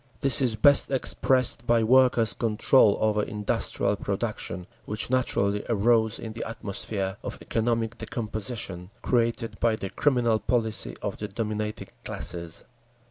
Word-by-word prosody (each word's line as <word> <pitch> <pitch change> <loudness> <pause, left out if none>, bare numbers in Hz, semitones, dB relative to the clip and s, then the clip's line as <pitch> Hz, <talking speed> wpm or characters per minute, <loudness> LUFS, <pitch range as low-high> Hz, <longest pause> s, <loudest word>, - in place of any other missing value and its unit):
This 135 -2 +6
is 120 -4 +2
best 140 +6 +5
expressed 130 -2 +1
by 115 -1 +3
Workers' 120 -2 +4
Control 110 0 +3
over 105 -1 +2
industrial 105 -1 -1
production, 100 -4 -4 0.2
which 105 +3 -2
naturally 105 -5 +1
arose 110 0 +2
in 110 -1 -7
the 115 - -5
atmosphere 100 -2 -4
of - - -6
economic 115 0 -2
decomposition 105 -5 -5
created 115 -1 -1
by 115 -1 +2
the 100 -3 -6
criminal 120 -6 +1
policy 110 - -1
of - - -3
the 105 - -5
dominating 105 -1 -4
classes…. 85 -1 -5
110 Hz, 130 wpm, -26 LUFS, 105-120 Hz, 0.2 s, This